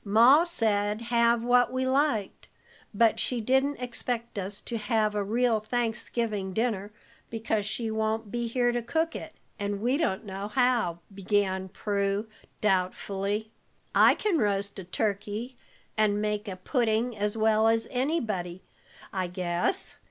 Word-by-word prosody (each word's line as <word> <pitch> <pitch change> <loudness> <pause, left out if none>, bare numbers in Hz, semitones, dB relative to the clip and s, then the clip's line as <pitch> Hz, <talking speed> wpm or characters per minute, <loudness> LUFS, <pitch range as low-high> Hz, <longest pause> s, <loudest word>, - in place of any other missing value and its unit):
"Ma 235 +9 +6
said, 215 -10 0
have 235 0 +2
what 245 0 +4
we 260 0 -1
liked, 260 -6 0 0.4
but 225 +2 +3
she 250 - -1
didn't 265 +5 +2
expect 240 -2 -3
us 195 +1 -3
to 235 - -5
have 215 0 +1
a 205 -1 0
real 230 +2 +2
Thanksgiving 225 -3 -2
dinner, 215 -2 -1 0.4
because 220 -2 -1
she 225 +1 -2
won't 220 -1 -1
be 240 0 -2
here 245 +1 +1
to 240 0 -1
cook 320 +8 -1
it, - - -7 0.2
and 205 0 -2
we 245 +6 +1
don't 215 - -1
know 195 0 -5
how," 240 -7 +1 0.2
began 190 -1 0
Prue, 200 +1 -1 0.4
doubtfully. 200 +2 0 0.4
"I - - +6
can 395 -7 +1
roast 200 -2 0
a - - -6
turkey 210 +5 -3 0.4
and 210 -1 +2
make 210 0 -2
a 190 - -4
pudding 230 +3 0
as 210 +1 -1
well 220 0 +3
as 225 0 +2
anybody, 220 - -2 0.5
I 185 -2 -1
guess. 180 - -1
220 Hz, 145 wpm, -28 LUFS, 200-240 Hz, 0.5 s, Ma